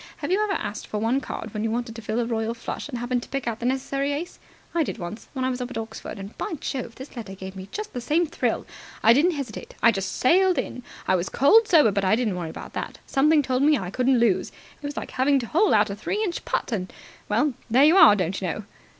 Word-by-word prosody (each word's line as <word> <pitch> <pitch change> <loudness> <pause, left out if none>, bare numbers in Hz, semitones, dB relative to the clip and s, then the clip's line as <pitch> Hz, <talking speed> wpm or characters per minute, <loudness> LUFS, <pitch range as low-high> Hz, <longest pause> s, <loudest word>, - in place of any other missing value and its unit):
Have - - -4
you 405 +3 +3
ever 415 -2 0
asked 210 - -4
for 215 - -3
one 230 +6 +1
card 225 -4 -6
when 210 0 -2
you 225 - 0
wanted 235 0 -3
to 230 - -7
fill 215 +2 -2
a 240 - +1
royal 225 0 -2
flush 235 +4 -6
and 250 - -4
happened 245 +1 -1
to - - -11
pick 275 -2 -3
out 225 -1 -2
the 240 - -1
necessary 275 +2 -1
ace? 330 +5 -5 0.3
I 340 - +2
did 295 - -2
once, 180 +3 -7
when 260 -2 -2
I 260 - +1
was 250 0 -4
up 250 - -4
at 255 - -6
Oxford, 220 -1 -6
and, 195 +2 -8
by - - -3
Jove, 255 -4 -4
this 265 +1 -10
letter 215 -5 -7
gave 190 0 -8
me 190 +1 -8
just 425 0 -5
the 245 - -4
same 310 +8 +2
thrill. 335 +2 -1 0.4
I 225 - +8
didn't 325 +8 +3
hesitate. 265 -7 -6
I 230 - +8
just 195 -2 -3
sailed 365 +6 +4
in. 250 - -3 0.3
I 185 - +4
was 180 +1 -1
cold 425 - +5
sober, 305 - +6
but 200 0 0
I 190 +2 +4
didn't 225 -5 0
worry 170 -2 -4
about - - -9
that. - - -5
Something 300 +2 +3
told 255 -1 0
me 295 +1 +5
I 180 -4 -5
couldn't 255 +3 +2
lose. 230 -5 +2 0.3
It - - -8
was 290 - -7
like - - -5
having 275 +2 +3
to 250 - -2
hole 365 - +2
out 210 -1 +4
a - - -4
three 410 - -2
inch 355 -5 -3
putt. - - -1
And 190 -5 -2 0.4
well, 245 +7 +2 0.2
there 255 +5 +6
you 320 +4 +6
are, 210 - +9
don't 185 -1 -2
you 185 - -1
know." 210 +5 -3
245 Hz, 270 wpm, -25 LUFS, 215-285 Hz, 0.4 s, are